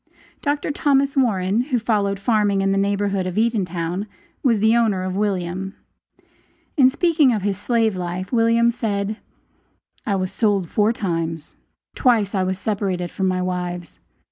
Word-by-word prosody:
Dr. 290 0 -1
Thomas 275 -1 +1
Warren, 210 -5 +2
who 260 -3 0
followed 205 -4 0
farming 205 -2 +2
in 195 0 +1
the 195 - +1
neighborhood 200 -1 0
of 185 - -4
Eatontown, 190 -4 -1 0.3
was 240 -5 +3
the 220 +2 +3
owner 215 -6 +2
of 185 0 -3
William. 190 -1 -2 1.0
In 260 -4 +6
speaking 315 -2 +3
of 215 -5 -1
his 200 -1 0
slave 225 -4 +1
life 180 +1 -4
William 230 0 +3
said: 215 -3 -2 0.9
"I 200 - 0
was 185 -1 -2
sold 200 -6 0
four 210 +1 +3
times; 165 -7 -3 0.4
twice 225 -6 +2
I 195 - +1
was 185 0 -1
separated 190 -3 -2
from 190 - -1
my 185 0 0
wives. 180 -2 -4
200 Hz, 150 wpm, -21 LUFS, 185-230 Hz, 1.0 s, In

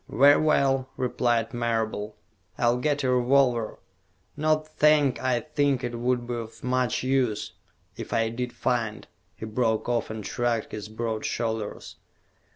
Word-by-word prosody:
"Very 140 +5 +6
well," 135 -4 +2
replied 120 -2 0
Marable. 110 -3 -2 0.4
"I'll 120 0 +2
get 145 +2 0
a 130 - +2
revolver. 125 -2 +2 0.6
Not 155 +1 -1
that 150 -3 +4
I 125 -2 +1
think 145 -4 0
it 120 -1 -3
would 125 0 0
be 120 - -4
of 115 -1 -7
much 125 -2 0
use, 130 -5 0 0.4
if - - -8
I 115 0 +1
did 125 +2 -4
find 120 -4 -2 0.2
" 90 0 -42
He - - -7
broke 110 0 0
off, 120 -1 0
and 110 -2 -6
shrugged 120 -2 -1
his 105 0 -6
broad 110 0 -3
shoulders. 110 -3 -3
120 Hz, 150 wpm, -26 LUFS, 115-130 Hz, 0.6 s, Very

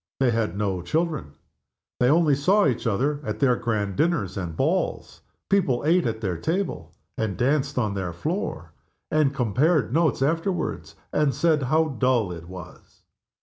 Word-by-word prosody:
They 130 -2 +3
had 110 -5 -1
no 100 -3 -1
children. 155 - -2 0.7
They 125 - +4
only 155 -1 +4
saw 190 +10 +3
each 125 -3 0
other 140 +8 0
at - - -3
their 130 -3 +3
grand 105 -5 -2
dinners 150 - 0
and 85 -4 -5
balls. - - -1 0.3
People 160 -11 +1
ate 170 0 +3
at 110 -1 -3
their 95 -5 -2
table, 180 - -2 0.3
and 105 -4 -1
danced 140 +2 +1
on 110 -5 0
their 95 -3 -3
floor, 85 0 -4 0.4
and 155 -3 +3
compared 135 - +1
notes 160 -4 +2
afterward, 165 +3 -1 0.2
and 145 -4 +2
said 155 +1 +2
how 160 +1 +3
dull 120 -6 +2
it 85 -1 -8
was. 90 -2 -12
130 Hz, 155 wpm, -24 LUFS, 105-155 Hz, 0.7 s, They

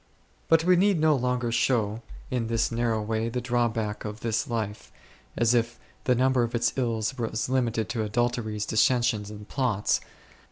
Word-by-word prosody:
But 165 0 +5
we 180 +1 +5
need 195 -1 +3
no 155 -1 +4
longer 125 -2 -1
show 115 -2 +1 0.3
in 120 -3 -1
this 115 0 0
narrow 115 -2 0
way 110 +1 -1
the 125 +2 -2
drawback 115 -4 -1
of 105 0 -6
this 110 -1 -1
life, 110 -3 -4 0.5
as 120 0 +3
if 120 -1 0 0.3
the 125 - +3
number 130 +1 +3
of 120 0 -1
its 115 - +1
ills 115 -1 -1
was 115 0 -2
limited 120 -4 0
to 115 - -2
adulteries, 110 -1 -1
dissensions, 110 -1 +2
and 105 0 -10
plots. 120 -7 0
115 Hz, 165 wpm, -27 LUFS, 110-125 Hz, 0.5 s, But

